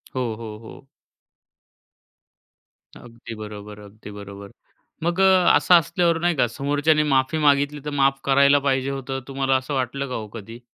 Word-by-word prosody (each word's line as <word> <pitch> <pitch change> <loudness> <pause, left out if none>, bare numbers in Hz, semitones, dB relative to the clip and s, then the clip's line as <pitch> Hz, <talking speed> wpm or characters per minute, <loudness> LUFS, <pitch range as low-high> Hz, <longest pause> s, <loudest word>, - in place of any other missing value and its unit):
हो, 130 - -1
हो, 110 -1 -9
हो. 115 +4 -13 2.1
अगदी 115 -1 -11
बरोबर, 105 -1 -9
अगदी 105 0 -13
बरोबर. 100 0 -10 0.5
मग 170 +2 -1
अ, 190 -2 +5
असं 180 - +3
असल्यावर 170 0 0
नाही 175 0 0
का 125 - +2
समोरच्याने 145 +5 0
माफी 135 +1 +1
मागितली 145 0 +2
तर - - -3
माफ 135 0 +2
करायला 140 +1 +4
पाहिजे 135 -1 -1
होतं, 135 -1 -5
तुम्हाला 135 -1 0
असं 130 +2 -3
वाटलं 135 +1 -2
का 125 - -4
हो 110 - -5
कधी? 115 +1 -10
135 Hz, 150 wpm, -22 LUFS, 115-145 Hz, 2.1 s, अ